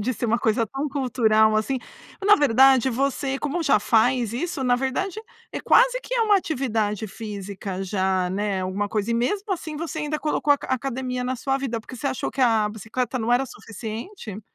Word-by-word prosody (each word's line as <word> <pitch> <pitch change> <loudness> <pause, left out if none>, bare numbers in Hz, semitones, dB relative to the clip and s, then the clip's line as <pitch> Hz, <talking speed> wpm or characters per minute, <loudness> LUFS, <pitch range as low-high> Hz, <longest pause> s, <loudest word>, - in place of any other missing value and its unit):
de 245 +4 -1
ser 235 - -2
uma 235 +2 +2
coisa 225 +1 +1
tão 270 +6 -4
cultural, 220 -6 +2
assim 220 +5 0 0.5
na 415 0 +7
verdade, 265 -1 +5
você, 270 +2 -1
como 300 +4 -2
já 275 -8 +4
faz 235 +1 +2
isso, 280 +3 -3
na 245 -1 +3
verdade, 365 +11 -2 0.3
é - - -4
quase - - +4
que - - -5
é 475 - +2
uma 420 -2 +4
atividade 225 - -1
física 200 -3 -6
já, 190 -1 0
né, 200 0 -1
alguma 195 +2 -2
coisa 210 +1 -1
e 235 - +2
mesmo 390 - -1
assim, 315 -4 -5
você 320 0 -4
ainda 300 0 -2
colocou 300 -1 +2
aca 285 - -3
academia 255 -1 -2
na 255 +1 -1
sua 270 +2 -1
vida, 240 -4 -3
porque 255 - -10
você 275 - -4
achou 260 -2 -2
que 270 - -5
a 225 -4 +3
bicicleta 225 +5 -3
não 230 +1 0
era 250 +2 +3
suficiente? 225 - -8
250 Hz, 195 wpm, -24 LUFS, 220-275 Hz, 0.5 s, na